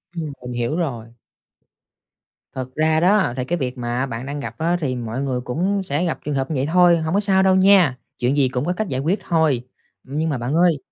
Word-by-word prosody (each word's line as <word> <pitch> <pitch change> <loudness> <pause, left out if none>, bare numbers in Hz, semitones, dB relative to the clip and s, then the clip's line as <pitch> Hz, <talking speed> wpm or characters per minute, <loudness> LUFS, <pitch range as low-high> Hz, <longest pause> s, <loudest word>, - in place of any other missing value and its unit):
Ừm, 155 -4 -4
mình 125 0 -6
hiểu 120 +5 -1
rồi. 135 -10 -3 1.5
Thật 130 -1 -4
ra 155 0 +2
đó 190 -6 +3
thì 125 - -2
cái 175 +5 -1
việc 130 -3 -3
mà 120 +2 -2
bạn 120 -1 -6
đang 145 +1 -5
gặp 115 -4 -7
á 170 +2 +1
thì 130 -3 -1
mọi 120 +2 -4
người 130 -3 -2
cũng 185 +11 -1
sẽ 155 +1 -1
gặp 165 - -2
trường 150 -1 -2
hợp 135 +1 -1
như - - -1
vậy 135 +1 0
thôi, 175 -1 +6
hông 160 0 -2
có 200 - +3
sao 195 -2 +3
đâu 190 -1 +4
nha, 190 -8 +5 0.2
chuyện 130 +4 +1
gì 135 -2 +3
cũng 125 +3 -2
có 180 - 0
cách 215 +2 -3
giải 130 -4 -2
quyết 175 +8 0
thôi. 160 -7 +2 0.4
Nhưng 150 +5 -2
mà 140 - -1
bạn 120 +4 -3
ơi, 170 -3 +4
145 Hz, 235 wpm, -21 LUFS, 130-175 Hz, 1.5 s, thôi